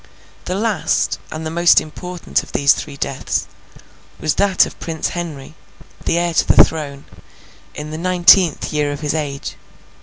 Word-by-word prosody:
The 180 Hz, -, -2 dB
last, 215 Hz, 0 st, 0 dB
and 160 Hz, 0 st, -5 dB
the 160 Hz, -, -3 dB
most 170 Hz, +1 st, +5 dB
important 180 Hz, +3 st, -3 dB
of -, -, -15 dB
these 140 Hz, 0 st, +5 dB
three 145 Hz, -2 st, -7 dB
deaths, 135 Hz, -1 st, -2 dB, 0.7 s
was 155 Hz, -2 st, 0 dB
that 200 Hz, -2 st, +3 dB
of -, -, -11 dB
Prince 160 Hz, -2 st, -3 dB
Henry, 155 Hz, -5 st, -6 dB, 0.5 s
the 170 Hz, -, +1 dB
heir 170 Hz, 0 st, 0 dB
to -, -, +2 dB
the -, -, +8 dB
throne, 145 Hz, -3 st, -5 dB, 0.7 s
in 150 Hz, +1 st, -6 dB
the 155 Hz, -, -5 dB
nineteenth 180 Hz, -2 st, +4 dB
year 150 Hz, -1 st, 0 dB
of 145 Hz, +1 st, -6 dB
his 150 Hz, -1 st, -1 dB
age. 145 Hz, -3 st, -4 dB
160 Hz, 160 wpm, -18 LUFS, 150-175 Hz, 0.7 s, the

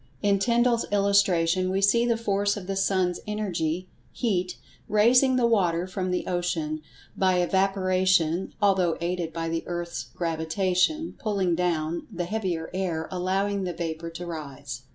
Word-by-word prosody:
In 200 Hz, -1 st, +3 dB
Tyndall's 235 Hz, +2 st, +2 dB
illustration 190 Hz, -3 st, +3 dB
we 190 Hz, +1 st, 0 dB
see 230 Hz, +5 st, +3 dB
the 235 Hz, -1 st, +2 dB
force 205 Hz, -2 st, 0 dB
of 195 Hz, -, -7 dB
the 195 Hz, +1 st, -3 dB
sun's 190 Hz, -2 st, +1 dB
Energy—heat—raising 210 Hz, -, 0 dB
the 250 Hz, -2 st, +3 dB
water 180 Hz, -7 st, +2 dB
from 185 Hz, 0 st, -3 dB
the 180 Hz, -, -1 dB
ocean, 165 Hz, -4 st, -2 dB, 0.3 s
by 185 Hz, -1 st, +2 dB
evaporation 185 Hz, -2 st, +2 dB
(although 190 Hz, -5 st, +2 dB
aided 170 Hz, -1 st, -2 dB
by 165 Hz, 0 st, -3 dB
the 165 Hz, 0 st, -1 dB
earth's 175 Hz, -1 st, -4 dB
gravitation 180 Hz, -, 0 dB
"pulling 200 Hz, -7 st, 0 dB
down" 170 Hz, -1 st, -1 dB
the 175 Hz, -3 st, -3 dB
heavier 180 Hz, -5 st, -3 dB
air, 175 Hz, -4 st, -2 dB
allowing 190 Hz, +2 st, 0 dB
the 180 Hz, -1 st, -2 dB
vapor 165 Hz, -1 st, -4 dB
to 170 Hz, +2 st, -7 dB
rise). 145 Hz, -6 st, -7 dB
185 Hz, 135 wpm, -26 LUFS, 170-200 Hz, 0.3 s, In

